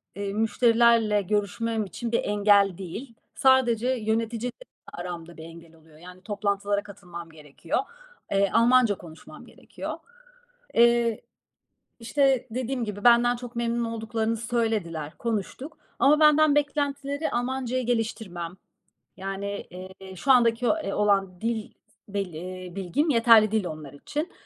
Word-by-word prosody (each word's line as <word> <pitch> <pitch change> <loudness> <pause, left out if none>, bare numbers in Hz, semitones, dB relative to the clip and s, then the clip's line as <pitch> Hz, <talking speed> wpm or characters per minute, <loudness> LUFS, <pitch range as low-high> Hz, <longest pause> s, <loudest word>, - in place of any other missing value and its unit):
eee, 200 0 -4
müşterilerle 225 -1 +3
görüşmem 210 +2 -1
için 230 +6 -6
bir 235 - +1
engel 200 -2 +3
değil. 215 +7 -8 0.2
Sadece 255 -4 +3
yöneticiyle 230 0 -1 0.4
aramda 175 -1 -7
bir 160 - -9
engel 165 0 -13
oluyor. 160 -1 -20
Yani, 180 +1 -13
toplantılara 205 -1 -1
katılmam 175 -5 -10
gerekiyor. 155 - -4 0.5
Eee, 200 0 +2
Almanca 235 -3 +4
konuşmam 160 -3 -13
gerekiyor. - - -8 0.8
Eee, 235 -1 +4 0.8
işte 265 +1 +1
dediğim 250 0 -2
gibi 205 -1 -6
benden 240 0 +6
çok 245 -1 -9
memnun 235 0 0
olduklarını 225 0 -2
söylediler. 215 -10 -2
Konuştuk 235 +7 -4 0.2
ama 300 +3 +5
benden 300 -1 +5
beklentileri 285 0 -1
Almancayı 255 0 -2
geliştirmem. 215 -7 -3 0.6
Yani, 195 +1 -5
eee, 190 +1 -10
şu 265 +10 +1
andaki, 240 -1 +4
eee, 310 -11 0
olan 195 -3 +1
dil 225 -2 -2 0.4
bil 195 -4 -3
eee, 180 +2 -8
bilgim 250 - -1
yeterli 230 -4 +6
değil 215 -4 0
onlar 155 -4 -7
için. 300 - -5
220 Hz, 125 wpm, -26 LUFS, 190-240 Hz, 0.8 s, benden